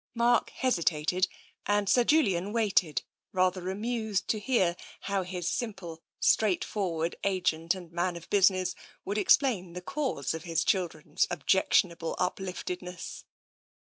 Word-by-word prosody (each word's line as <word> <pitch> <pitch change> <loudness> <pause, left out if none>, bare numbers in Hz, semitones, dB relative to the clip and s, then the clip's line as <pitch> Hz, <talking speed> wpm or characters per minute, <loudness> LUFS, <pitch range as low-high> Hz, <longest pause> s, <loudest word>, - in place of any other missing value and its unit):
Mark 235 0 +3
hesitated 180 - +1 0.4
and 205 0 +2
Sir 245 +4 +5
Julian 205 - +2
waited, 200 - +1 0.3
rather 185 0 +1
amused 215 0 -2
to 215 - +1
hear 200 -6 +2 0.3
how 195 -1 -1
his 180 -1 -4
simple, 185 -6 -4 0.2
straightforward 180 -5 +1
agent 175 -3 +1
and 175 -3 -10
man 175 +1 -1
of 170 - -9
business 185 -2 +3 0.3
would 205 +2 -1
explain 200 -4 +3
the 180 - -5
cause 260 - -2
of 160 - -5
his 165 -2 0
chil 185 -3 +2
dren's 155 +1 -2
objectionable 170 0 +1
upliftedness. 180 -1 -4
185 Hz, 125 wpm, -29 LUFS, 170-205 Hz, 0.4 s, Sir